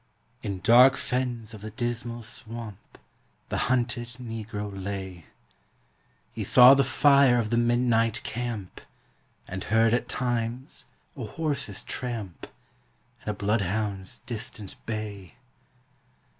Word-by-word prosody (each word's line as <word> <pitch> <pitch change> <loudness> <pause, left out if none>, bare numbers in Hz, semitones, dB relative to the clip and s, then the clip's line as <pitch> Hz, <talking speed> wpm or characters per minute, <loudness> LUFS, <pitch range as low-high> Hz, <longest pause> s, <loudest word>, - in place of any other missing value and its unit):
In 100 -3 -4
dark 125 +5 +7
fens 120 -3 -2
of 105 - -10
the 110 - -6
Dismal 120 +1 -3
Swamp 115 -2 -7 0.5
The - - -1
hunted 120 -1 +1
Negro 110 -3 -5
lay; 95 -3 -6 1.1
He - - -4
saw 125 +1 +9
the 140 0 +4
fire 140 -1 +5
of 115 -2 -1
the 115 - +2
midnight 120 -1 +2
camp, 115 -5 -5 0.7
And 95 0 -5
heard 115 +1 +3
at 120 - 0
times 120 +1 -3 0.3
a 130 -5 -5
horse's 140 -6 -2
tramp 115 -8 -5 0.7
And - - -6
a - - 0
bloodhound's 100 -1 -1
distant 110 -3 -5
bay. 105 -5 -5
115 Hz, 115 wpm, -27 LUFS, 105-120 Hz, 1.1 s, saw